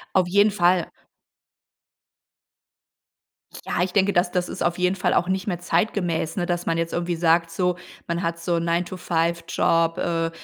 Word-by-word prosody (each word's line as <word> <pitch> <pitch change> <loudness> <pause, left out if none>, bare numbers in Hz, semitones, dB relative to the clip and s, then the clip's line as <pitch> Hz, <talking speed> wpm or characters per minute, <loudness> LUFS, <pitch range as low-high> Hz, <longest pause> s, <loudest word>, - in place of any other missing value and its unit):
Auf 185 -2 +3
jeden 200 +3 +4
Fall. 180 -2 +2 2.8
Ja, - - -1
ich 180 0 -1
denke, 200 0 +3
das 175 0 +2
dss 180 -1 -1
ist - - -7
auf 175 0 0
jeden 180 +1 +1
Fall 180 - 0
auch 175 - +2
nicht 190 +1 -2
mehr 175 -3 -1
zeitgemäß, 175 -2 -1
ne, 175 -3 -1
dass 175 0 -2
man 165 - +1
jetzt 165 0 -2
irgendwie 175 0 -1
sagt 165 0 +2
so, 180 +1 -1 0.3
man 170 +1 -2
hat 170 0 -2
so 170 0 0
9 170 +1 0
to 185 - -7
5 170 -1 -1
Job, 165 0 +1
äh, 165 -1 -1
175 Hz, 180 wpm, -23 LUFS, 170-180 Hz, 2.8 s, jeden